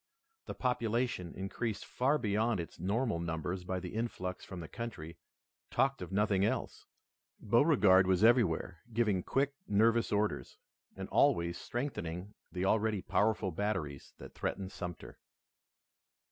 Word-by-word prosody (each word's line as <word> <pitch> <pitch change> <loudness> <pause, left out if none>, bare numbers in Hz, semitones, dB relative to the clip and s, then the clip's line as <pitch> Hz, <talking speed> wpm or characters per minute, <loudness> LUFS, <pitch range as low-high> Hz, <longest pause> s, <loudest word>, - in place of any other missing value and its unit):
The - - -5
population, 120 -7 -1
increased 100 +3 -3
far 135 +4 +1
beyond 110 -2 +1
its 85 - -7
normal 105 +2 0
numbers 85 +2 -3
by 90 +1 -2
the 90 0 -7
influx 95 -5 -3
from 95 - -8
the 80 - -6
country, 85 -9 -7 0.5
talked 135 0 +1
of 90 0 -6
nothing 100 -1 +2
else. 105 - -2 0.5
Beauregard 105 - +5
was 95 +1 +3
everywhere 100 -7 +3
giving 105 -5 +2
quick, 135 +8 0
nervous 115 +3 +3
orders, 105 +1 -1 0.4
and - - -6
always 85 0 +3
strengthening 100 - -4 0.2
the 90 0 -2
already 110 -1 +1
powerful 100 +1 +1
batteries 80 -7 -3
that - - -11
threatened 95 -1 -3
Sumter. 90 -2 -7
100 Hz, 130 wpm, -33 LUFS, 90-115 Hz, 0.5 s, Beauregard